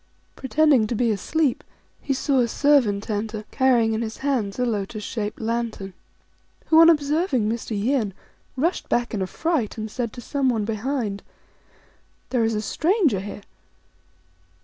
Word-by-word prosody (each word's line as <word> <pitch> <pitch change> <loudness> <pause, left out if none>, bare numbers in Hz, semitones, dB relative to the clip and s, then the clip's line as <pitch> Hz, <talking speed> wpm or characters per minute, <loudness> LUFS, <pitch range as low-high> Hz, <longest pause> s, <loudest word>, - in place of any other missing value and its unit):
Pretending 270 -3 +3
to 235 - -2
be 235 0 +2
asleep, 275 - 0 0.4
he - - -3
saw 275 0 +1
a 240 - +3
servant 235 -7 +2
enter, 215 0 -3
carrying 245 -4 +3
in 220 - -1
his 220 -1 -4
hand 230 -8 0
a 250 - +1
lotus 210 -1 -3
shaped 210 -1 -4
lantern, 225 -4 -3 0.7
3 - - -32
who, 320 0 +7
on 330 - +8
observing 295 - +2
Mr. 220 -1 -3
Yin, 220 -3 0 0.4
rushed 330 +7 -1
back 240 0 0
in 205 - -2
a 190 - -1
fright, 305 - -1
and 215 -1 -5
said 235 -2 -3
to - - -9
someone 245 -4 0
behind, 225 -1 -2 0.5
" - - -35
There 245 -3 +2
is 225 0 +1
a 210 - -1
stranger 320 - +1
here 200 +1 -7
235 Hz, 160 wpm, -23 LUFS, 215-275 Hz, 0.7 s, on